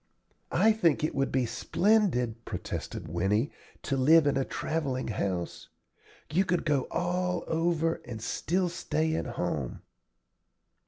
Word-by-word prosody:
"I 220 - +6
think 170 -10 +2
it 155 - 0
would 135 0 0
be 130 -1 +2
splendid," 125 - +1
protested - - -5
Winnie, 95 - +1 0.3
"to 140 - -1
live 150 +4 +6
in 145 - +2
a 135 - +2
travelling 140 -4 -2
house. 95 -4 -3 0.6
You 185 +4 +4
could 180 -2 0
go 145 -4 +1
all 180 0 -1
over 165 0 0
and 120 -3 -6
still 180 - 0
stay 160 -2 -1
at - - -1
home." - - -2
155 Hz, 130 wpm, -29 LUFS, 125-175 Hz, 0.6 s, I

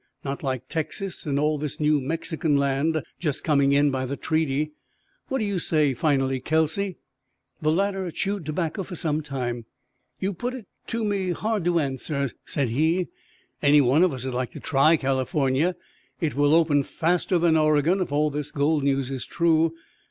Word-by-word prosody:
Not 140 0 -3
like 130 -3 -3
Texas 170 +3 -4
and 140 -1 +1
all 150 0 +1
this 150 +1 -4
new 150 -1 +3
Mexican 160 +1 0
land 140 +3 +1 0.2
just 150 -5 -2
coming 140 -3 +3
in 145 0 +4
by 130 -1 -2
the 140 +2 -4
treaty. 155 -1 0 0.6
What 265 - -1
do 220 - -1
you 200 -3 -1
say, 155 -4 +2
finally, 135 -1 +1
Kelsey?" 160 +7 0 0.6
The 155 - +2
latter 195 +1 0
chewed 200 +2 -2
tobacco 160 +4 -2
for 185 0 -7
some 155 -2 -1
time. 125 -5 -4 0.5
"You 195 +1 -1
put 245 +8 -4
it 245 -5 -9 0.2
to 230 -1 -2
me 200 -3 0
hard 215 -2 -2
to 175 -1 +2
answer," 140 -1 -2
said 140 -5 -1
he. 160 +9 +1 0.5
"Any 145 0 +6
one 140 +3 +4
of 185 - +3
us'd 130 -1 -4
like 125 0 -1
to - - -7
try 155 +3 +4
California. 135 +4 +1 0.4
It 160 -4 -1
will 145 +2 +3
open 155 -4 +4
faster 175 +5 0
than 170 -1 +3
Oregon 155 +4 +3
if 180 - -2
all 150 +1 +2
this 145 0 -3
gold 145 +1 +1
news 135 -1 0
is 130 -2 -5
true. 165 -1 +2
155 Hz, 175 wpm, -25 LUFS, 140-170 Hz, 0.6 s, Any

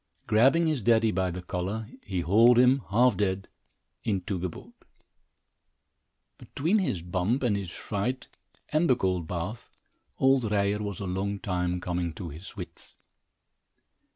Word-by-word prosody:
Grabbing 135 +10 +4
his 155 -5 0
daddy 115 0 +3
by 95 -1 0
the 90 +1 -6
collar, 95 +5 -3
he 95 -3 -3
hauled 115 +8 +5
him, 125 +2 +5
half 120 +3 +4
dead, 95 0 -1 0.6
into 95 -3 -1
the 90 +1 -2
boat. - - -12 1.7
Between 170 +10 0
his 95 - -1
bump 90 +9 0
and 115 -5 +2
his 100 -3 -4
fright, 110 +8 -3 0.4
and 155 +2 +2
the 130 - +6
cold 90 -7 -1
bath, 90 +7 -5 0.5
old 135 -4 +3
Ryer 100 0 +1
was 100 -3 -4
a - - -3
long 95 +2 -2
time 90 -4 -2
coming 90 -2 -2
to 90 -4 -6
his 80 +6 -10
wits. - - -9
100 Hz, 145 wpm, -28 LUFS, 90-120 Hz, 1.7 s, the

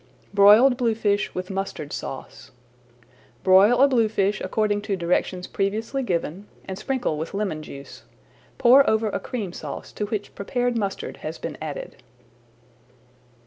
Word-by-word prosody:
BROILED 210 +6 +7
BLUEFISH 220 -4 0
WITH 185 +1 -4
MUSTARD 195 -6 -4
SAUCE 135 - -7 0.9
Broil 195 +6 +6
a - - +7
bluefish 215 -5 +1
according 210 -1 0
to 205 -1 -2
directions 180 +1 -1
previously 220 +7 -2
given, 185 - -3 0.2
and 190 0 -6
sprinkle 250 - -2
with 165 +5 -5
lemon 195 -7 -2
juice. 140 -2 -10 0.6
Pour 265 +3 +6
over 220 0 +1
a - - -2
Cream 205 -8 -5
Sauce - - -7
to 210 - -4
which 210 -1 -4
prepared 245 +4 -1
mustard 200 -4 -3
has 155 +1 -6
been 155 - -6
added. 155 -2 -6
205 Hz, 135 wpm, -24 LUFS, 185-230 Hz, 0.9 s, BROILED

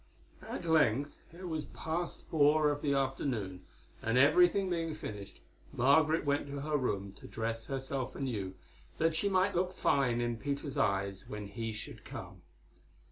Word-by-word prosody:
At - - -4
length 145 -4 +3 0.2
it 180 +2 -8
was 160 -3 -2
past 170 +2 -4
four 150 0 +4
of 145 0 -3
the 140 -2 +1
afternoon, 120 -9 -1 0.4
and 115 +2 +1
everything 175 +8 +5
being 165 -3 -1
finished, 105 -9 -8 0.3
Margaret 155 +5 +4
went 145 0 +1
to 140 0 -5
her 150 +1 -1
room 100 -8 -1
to - - -10
dress 115 0 -3
herself 135 -1 -3
anew, 105 -9 -3 0.4
that 165 0 +2
she 200 +5 +1
might 190 +1 +3
look 180 +1 0
fine 130 -8 +2
in 120 -1 -1
Peter's 140 +2 -3
eyes 100 -1 0
when 105 -1 -5
he 110 +3 -4
should 105 - -8
come. - - -8
140 Hz, 155 wpm, -33 LUFS, 115-160 Hz, 0.4 s, everything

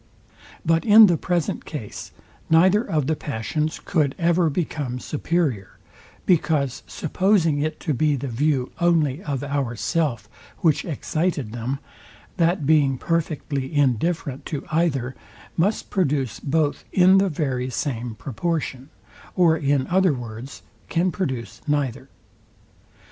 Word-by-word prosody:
But 165 +1 +3
in 220 0 +9
the 175 -4 +3
present 175 0 -1
case 120 -10 -7 0.4
neither 185 +6 +5
of 155 - -1
the 160 +3 +1
passions 150 +4 -3
could 150 -6 0
ever 170 0 +2
become 145 -5 -3
superior; 145 - -2 0.5
because 150 -6 +1
supposing 170 -2 +1
it 155 +2 -2
to 155 - -1
be 150 +3 +2
the 140 +1 -4
view 130 +1 0
only 165 -4 +2
of 140 -3 -3
ourself, 135 -3 -1 0.3
which 160 -4 +2
excited 155 -5 -2
them, 120 +4 -3 0.6
that 170 -2 +2
being 140 -3 +3
perfectly 150 -4 -2
indifferent 145 0 0
to 145 - -4
either, 140 -6 0 0.4
must 195 +6 0
produce 140 - 0
both 150 0 0
in 185 +1 +6
the 195 0 +2
very 130 -5 -2
same 120 -2 -3
proportion; 140 0 -3 0.5
or 170 -3 +5
in 140 -3 +1
other 185 -2 +3
words, 120 +1 -8 0.3
can 175 +2 +1
produce 130 - -4
neither. 145 -5 -1
150 Hz, 120 wpm, -23 LUFS, 130-170 Hz, 0.6 s, in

